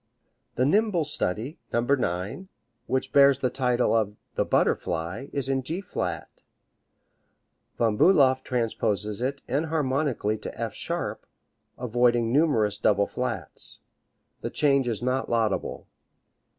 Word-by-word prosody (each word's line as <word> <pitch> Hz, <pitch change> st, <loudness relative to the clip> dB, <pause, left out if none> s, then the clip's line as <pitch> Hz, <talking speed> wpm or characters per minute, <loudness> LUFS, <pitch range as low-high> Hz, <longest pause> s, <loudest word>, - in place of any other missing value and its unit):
The 125 Hz, -, +2 dB
nimble 195 Hz, 0 st, +2 dB
study, 115 Hz, -, -2 dB
No. 120 Hz, -, +2 dB
9, 120 Hz, -, -1 dB, 0.4 s
which 130 Hz, 0 st, -1 dB
bears 140 Hz, -1 st, +6 dB
the 130 Hz, -2 st, -1 dB
title 125 Hz, -3 st, +1 dB
of 105 Hz, -2 st, +1 dB, 0.2 s
"The -, -, +1 dB
Butterfly," 85 Hz, +10 st, 0 dB
is 140 Hz, -2 st, -1 dB
in 135 Hz, -1 st, 0 dB
G 160 Hz, +8 st, -4 dB
flat 195 Hz, -, -5 dB, 1.4 s
Von 110 Hz, -3 st, +1 dB
Bulow 140 Hz, -, +6 dB
transposes 105 Hz, -3 st, -1 dB
it 135 Hz, +2 st, -2 dB
enharmonically 140 Hz, -6 st, 0 dB
to -, -, -7 dB
F -, -, -3 dB
sharp, -, -, -4 dB, 0.5 s
avoiding 120 Hz, -1 st, +2 dB
numerous 115 Hz, -9 st, +2 dB
double 100 Hz, -1 st, +3 dB
flats. 115 Hz, -, -4 dB, 0.6 s
The -, -, -3 dB
change 140 Hz, -3 st, +2 dB
is 115 Hz, -1 st, -2 dB
not 130 Hz, +1 st, 0 dB
laudable. 115 Hz, -4 st, -1 dB
125 Hz, 120 wpm, -26 LUFS, 110-140 Hz, 1.4 s, bears